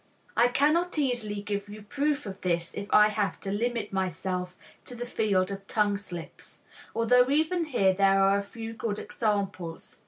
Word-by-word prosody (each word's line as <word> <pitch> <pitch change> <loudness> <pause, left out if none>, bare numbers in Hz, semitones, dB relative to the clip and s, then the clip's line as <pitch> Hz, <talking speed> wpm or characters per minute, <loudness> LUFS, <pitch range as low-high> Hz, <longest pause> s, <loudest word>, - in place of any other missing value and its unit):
I 235 - +5
cannot 305 +7 +2
easily 240 -8 -1
give 205 0 -3
you 210 0 -9
proof 290 +5 -1
of 195 -1 -7
this 170 -2 -1
if 200 - -5
I 210 0 +7
have 210 -2 -1
to 195 - -4
limit 230 0 -2
myself 185 -1 -2 0.3
to 245 - -8
the 240 +1 -5
field 200 -5 +1
of 195 0 -7
tongue 210 -2 +1
slips, 175 -5 -9 0.3
although 245 +3 +4
even 320 +4 +2
here 200 -10 +2
there 195 0 +4
are 195 +1 +4
a - - -4
few 225 +2 -7
good 220 -2 -3
examples. 200 -6 -3
210 Hz, 175 wpm, -28 LUFS, 195-245 Hz, 0.3 s, I